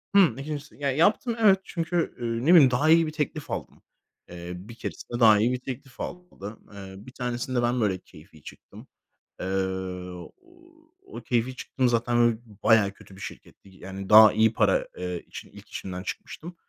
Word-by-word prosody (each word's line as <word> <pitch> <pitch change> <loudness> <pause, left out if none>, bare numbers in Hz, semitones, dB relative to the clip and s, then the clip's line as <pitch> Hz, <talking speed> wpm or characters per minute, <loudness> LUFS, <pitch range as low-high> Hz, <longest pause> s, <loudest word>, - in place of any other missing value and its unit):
Hımm, 175 - +5
2’ncisi 150 +1 -6
Ya, 140 -2 -1
yaptım, 205 - +2
evet. 195 -3 +5
Çünkü, 170 -1 -2
ııı, 115 +2 -2
ne 175 - +6
bileyim, 140 -7 +8
daha 145 +6 +2
iyi 165 0 +5
bir - - -4
teklif 155 0 -4
aldım. - - -6 0.5
Eee, 85 0 -8
bir 100 +6 -11
keresinde 120 0 -6
daha 110 -3 +7
iyi 115 +3 +2
bir 125 - -2
teklif 130 +1 -9
aldım. 175 - -8
Iıı, 95 0 -10
bir 130 - -11
tanesinde 125 0 -2
ben, 120 0 0
böyle, 100 -3 +1
keyfi 80 -4 -18
çıktım. - - -13 0.5
Eee, - - -4 1.6
o 390 - -9
keyfi 125 +1 0
çıktığım 130 -1 -1
zaten 120 0 +1
öyle 120 -1 +3
b 110 -2 -19
bayağı 110 -4 +4
kötü 100 -2 -16
bir 95 - -13
şirketti. 100 - -11
Yani, 95 +1 -9
daha 110 0 +9
iyi 110 0 +3
para, - - +2
ııı, 90 -1 -4
için - - -11
ilk - - -15
işimden 90 -1 -6
çıkmıştım. 170 - -7
120 Hz, 175 wpm, -26 LUFS, 100-145 Hz, 1.6 s, daha